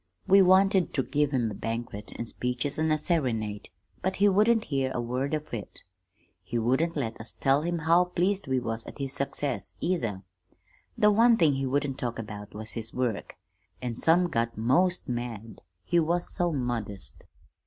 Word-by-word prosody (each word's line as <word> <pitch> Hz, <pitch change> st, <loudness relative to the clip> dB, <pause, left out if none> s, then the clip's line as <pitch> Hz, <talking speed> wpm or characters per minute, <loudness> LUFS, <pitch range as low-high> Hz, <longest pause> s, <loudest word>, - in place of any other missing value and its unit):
We 195 Hz, +1 st, +6 dB
wanted 190 Hz, 0 st, +4 dB
ter 135 Hz, -, +2 dB
give 145 Hz, +2 st, +1 dB
him 120 Hz, -6 st, 0 dB
a -, -, -5 dB
banquet 115 Hz, -1 st, -5 dB
an' 115 Hz, -, -3 dB
speeches 125 Hz, +5 st, -2 dB
and 160 Hz, 0 st, +2 dB
a 155 Hz, -, +3 dB
serenade, 115 Hz, -, -1 dB, 0.3 s
but 190 Hz, -, -1 dB
he 205 Hz, -, +4 dB
wouldn't 215 Hz, +3 st, +4 dB
hear 135 Hz, -2 st, -1 dB
a -, -, 0 dB
word 125 Hz, +5 st, -1 dB
of 155 Hz, -3 st, -7 dB
it. 110 Hz, -4 st, -6 dB, 0.6 s
He 95 Hz, +6 st, -4 dB
wouldn't 130 Hz, +9 st, +1 dB
let 115 Hz, -6 st, -3 dB
us 110 Hz, -, -7 dB
tell 135 Hz, +2 st, +2 dB
him 170 Hz, +2 st, -1 dB
how 165 Hz, +2 st, +4 dB
pleased 185 Hz, +1 st, 0 dB
we 130 Hz, -1 st, +1 dB
was 115 Hz, -2 st, -3 dB
at -, -, -9 dB
his 135 Hz, -1 st, -3 dB
success, 120 Hz, -9 st, -3 dB
either. 115 Hz, -, -1 dB, 0.7 s
The 210 Hz, -2 st, +5 dB
one 230 Hz, +2 st, +5 dB
thing 160 Hz, -6 st, +4 dB
he 135 Hz, 0 st, -1 dB
wouldn't 140 Hz, 0 st, -1 dB
talk 120 Hz, -2 st, -3 dB
about 105 Hz, -2 st, -8 dB
was 110 Hz, +1 st, -5 dB
his 115 Hz, -1 st, -6 dB
work, 125 Hz, -5 st, -2 dB, 0.4 s
an' 120 Hz, -2 st, -4 dB
some 175 Hz, +5 st, +4 dB
got 115 Hz, -7 st, -1 dB
most 170 Hz, +11 st, +2 dB
mad, 115 Hz, -4 st, -5 dB, 0.2 s
he 175 Hz, -, +2 dB
was 170 Hz, +2 st, 0 dB
so 175 Hz, -2 st, +1 dB
modest. 120 Hz, -, -2 dB
135 Hz, 180 wpm, -28 LUFS, 115-170 Hz, 0.7 s, We